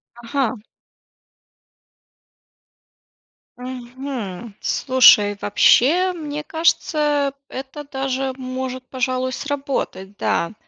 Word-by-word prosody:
Ага. 240 Hz, -1 st, -2 dB, 3.0 s
Мгм, 245 Hz, -5 st, -6 dB
слушай, 210 Hz, -6 st, +5 dB
вообще, 330 Hz, -, +4 dB
мне 300 Hz, -3 st, -5 dB
кажется, 295 Hz, -3 st, +1 dB, 0.2 s
это 270 Hz, +3 st, -7 dB
даже 270 Hz, -1 st, -2 dB
может, 255 Hz, 0 st, -5 dB
пожалуй, 255 Hz, 0 st, -1 dB
сработать, 275 Hz, -9 st, -4 dB
да. 170 Hz, +5 st, 0 dB
260 Hz, 65 wpm, -21 LUFS, 245-285 Hz, 3.0 s, слушай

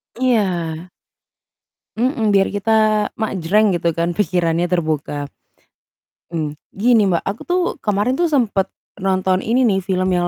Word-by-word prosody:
Iya. 185 Hz, -9 st, 0 dB, 1.1 s
Mhm, 235 Hz, -2 st, +1 dB
biar 195 Hz, -1 st, +4 dB
kita 215 Hz, 0 st, +2 dB
mak 220 Hz, 0 st, -2 dB
jreng 205 Hz, +5 st, +3 dB
gitu 170 Hz, -1 st, 0 dB
kan 170 Hz, +1 st, 0 dB
pikirannya 175 Hz, -3 st, 0 dB
terbuka. 155 Hz, -4 st, -1 dB, 1.0 s
Mmm, 160 Hz, -3 st, -3 dB, 0.2 s
gini, 220 Hz, 0 st, +3 dB
Mbak, 175 Hz, -3 st, 0 dB
aku 195 Hz, +3 st, -4 dB
tuh 360 Hz, +1 st, +1 dB, 0.2 s
kemarin 210 Hz, +6 st, 0 dB
tuh 345 Hz, -, +3 dB
sempet 230 Hz, -, +1 dB, 0.3 s
nonton 185 Hz, -1 st, +1 dB
ini 240 Hz, +6 st, +1 dB
nih 200 Hz, -5 st, +3 dB
film 185 Hz, 0 st, -1 dB
yang 175 Hz, -1 st, +1 dB
195 Hz, 135 wpm, -19 LUFS, 175-220 Hz, 1.1 s, biar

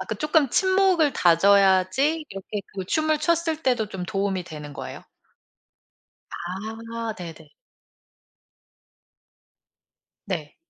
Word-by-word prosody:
아 -, -, -4 dB
그 220 Hz, -, -1 dB
쪼끔 305 Hz, -, +2 dB
친목을 375 Hz, -3 st, +3 dB
다져야지 195 Hz, -, +3 dB
이렇게 195 Hz, +2 st, -6 dB
그 190 Hz, -2 st, -4 dB
춤을 310 Hz, +6 st, +1 dB
췄을 320 Hz, 0 st, 0 dB
때도 245 Hz, -5 st, +1 dB
좀 190 Hz, -3 st, -5 dB
도움이 195 Hz, -1 st, -2 dB
되는 150 Hz, -3 st, -9 dB
거예요? -, -, -8 dB, 1.3 s
아. 225 Hz, +5 st, -5 dB
네네. 165 Hz, -3 st, -9 dB, 2.8 s
네. 160 Hz, -6 st, -4 dB
210 Hz, 190 characters per minute, -24 LUFS, 185-305 Hz, 2.8 s, 친목을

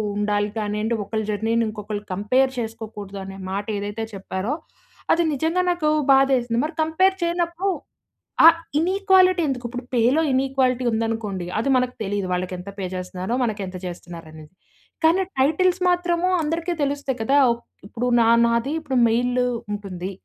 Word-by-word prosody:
ఉండాలి 205 Hz, 0 st, 0 dB
కానియండి, 215 Hz, +1 st, -1 dB
ఒకలి 220 Hz, +2 st, -3 dB
జర్నీని 225 Hz, +2 st, +1 dB
ఇంకొకళ్ళు 210 Hz, -1 st, -5 dB
కంపేర్ 255 Hz, +8 st, +2 dB
చేసుకోకూడదు 220 Hz, -3 st, -6 dB
అనే 195 Hz, 0 st, -8 dB, 0.2 s
మాట 200 Hz, +1 st, -2 dB
ఏదైతే 205 Hz, +2 st, -4 dB
చెప్పారో 195 Hz, +4 st, -3 dB, 0.6 s
అది 340 Hz, -, +2 dB
నిజంగా 320 Hz, +6 st, 0 dB
నాకు 335 Hz, -3 st, 0 dB, 0.2 s
బాధ 270 Hz, 0 st, +6 dB
ఏసింది. 235 Hz, -1 st, -1 dB
మరి 310 Hz, +3 st, -3 dB
కంపేర్ 370 Hz, +5 st, +3 dB
చేయనప్పుడు 345 Hz, +2 st, -1 dB, 0.8 s
ఆ -, -, +12 dB, 0.3 s
ఇనీక్వాలిటీ 370 Hz, 0 st, +4 dB
ఎందుకు? 250 Hz, -2 st, -3 dB
ఇప్పుడు 245 Hz, +1 st, -6 dB
పేలో 245 Hz, +6 st, +3 dB
ఇనీక్వాలిటీ 260 Hz, -1 st, +1 dB
ఉందనుకోండి 220 Hz, -5 st, -2 dB
అది 275 Hz, -, 0 dB
మనకు 250 Hz, 0 st, 0 dB
తెలీదు. 200 Hz, -1 st, -2 dB
వాళ్ళకి 180 Hz, +1 st, -2 dB
ఎంత 180 Hz, +3 st, -9 dB
పే 195 Hz, -, -3 dB
జేస్తున్నారో 185 Hz, +4 st, -4 dB
మనకెంత 205 Hz, -5 st, -3 dB
జేస్తున్నారో 175 Hz, -2 st, -8 dB
ఆనేది. 155 Hz, 0 st, -13 dB, 0.5 s
కానీ 335 Hz, +4 st, +4 dB, 0.2 s
టైటిల్స్ 355 Hz, +6 st, +2 dB
మాత్రము 350 Hz, 0 st, +1 dB
అందరికి 330 Hz, +3 st, -2 dB
తెలుస్తాయి 280 Hz, -3 st, -2 dB
కదా! 270 Hz, +6 st, +2 dB, 0.2 s
ఒక్ 235 Hz, -, -16 dB, 0.2 s
ఇప్పుడు 245 Hz, +3 st, -3 dB
న -, -, +6 dB, 0.2 s
నాది 235 Hz, +4 st, 0 dB
ఇప్పుడు 275 Hz, -4 st, -3 dB
మెయిల్ 245 Hz, +2 st, +1 dB, 0.3 s
ఉంటుంది. 195 Hz, -3 st, -5 dB
235 Hz, 145 wpm, -23 LUFS, 205-305 Hz, 0.8 s, ఆ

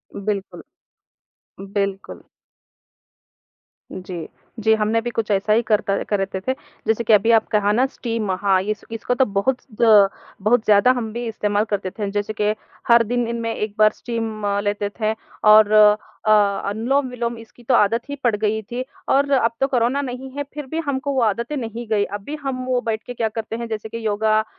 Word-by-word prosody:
बिल्कुल। 200 Hz, -1 st, -4 dB, 1.1 s
बिल्कुल। 195 Hz, -1 st, -3 dB, 1.7 s
जी। 185 Hz, -2 st, -7 dB, 0.3 s
जी, 220 Hz, 0 st, +3 dB
हमने 215 Hz, +1 st, +1 dB
भी 240 Hz, -, -3 dB
कुछ 225 Hz, -2 st, -3 dB
ऐसा 205 Hz, +2 st, +2 dB
ही 225 Hz, -, +4 dB
कर 220 Hz, -2 st, +1 dB
क 195 Hz, -, +1 dB
करते 195 Hz, -2 st, -1 dB
थे। 260 Hz, -, +2 dB, 0.3 s
जैसे 220 Hz, +1 st, +1 dB
कि 225 Hz, -, +3 dB
अभी 210 Hz, +3 st, +5 dB
आप 225 Hz, -1 st, +4 dB
कहा 205 Hz, -1 st, +2 dB
ना 245 Hz, +5 st, +3 dB
स्टीम 230 Hz, -6 st, -3 dB
हाँ, 195 Hz, -2 st, +3 dB
इस 215 Hz, +2 st, -3 dB
इसको 225 Hz, +2 st, -2 dB
तो 265 Hz, -, +3 dB
बहुत 205 Hz, +5 st, 0 dB, 0.2 s
द 215 Hz, -4 st, +7 dB, 0.3 s
बहुत 220 Hz, +3 st, +2 dB
ज़्यादा 210 Hz, +4 st, +5 dB
हम 225 Hz, -3 st, -3 dB
भी 240 Hz, +1 st, -4 dB
इस्तेमाल 210 Hz, -2 st, 0 dB
करते 200 Hz, -2 st, -2 dB
थे 205 Hz, +1 st, -4 dB
जैसे 205 Hz, +1 st, -2 dB
कि 210 Hz, 0 st, +2 dB, 0.3 s
हर 235 Hz, 0 st, +6 dB
दिन 240 Hz, +1 st, -1 dB
इनमें 230 Hz, -1 st, -2 dB
एक 210 Hz, -1 st, -4 dB
बार 215 Hz, 0 st, +6 dB
स्टीम 225 Hz, -3 st, -5 dB
अ, -, -, +1 dB
लेते 205 Hz, 0 st, -1 dB
थे 215 Hz, 0 st, +1 dB, 0.4 s
और 215 Hz, -1 st, +7 dB
अ, 215 Hz, 0 st, +3 dB, 0.4 s
अनुलोम-विलोम 240 Hz, +1 st, -1 dB
इसकी 230 Hz, +2 st, -16 dB
तो 250 Hz, -, +1 dB
आदत 225 Hz, +3 st, +3 dB
ही 285 Hz, -, -3 dB
पड़ 235 Hz, -4 st, +3 dB
गई 215 Hz, +1 st, 0 dB
थी 240 Hz, +4 st, -5 dB, 0.3 s
और 280 Hz, +1 st, +3 dB
अब 250 Hz, -4 st, +3 dB
तो 270 Hz, -, +4 dB
कोरोना 255 Hz, +1 st, +1 dB
नहीं 260 Hz, 0 st, -6 dB
है 285 Hz, -, -1 dB
फ़िर 295 Hz, -1 st, -6 dB
भी 320 Hz, -, -1 dB
हमको 280 Hz, 0 st, -2 dB
वो 265 Hz, -, +1 dB
आदतें 235 Hz, +6 st, -1 dB
नहीं 235 Hz, -1 st, -5 dB
गईं। 210 Hz, -2 st, +2 dB
अब 205 Hz, -, -4 dB
भी 290 Hz, +8 st, -5 dB
हम 265 Hz, -2 st, -3 dB
वो 255 Hz, -1 st, +1 dB
बैठ 220 Hz, -1 st, -3 dB
के 245 Hz, -, -5 dB
क्या 230 Hz, -2 st, -1 dB
करते 225 Hz, 0 st, -5 dB
हैं 235 Hz, 0 st, -5 dB
जैसे 220 Hz, -1 st, -5 dB
कि 230 Hz, 0 st, -6 dB
योगा। 215 Hz, +1 st, +2 dB
220 Hz, 195 wpm, -21 LUFS, 210-240 Hz, 1.7 s, द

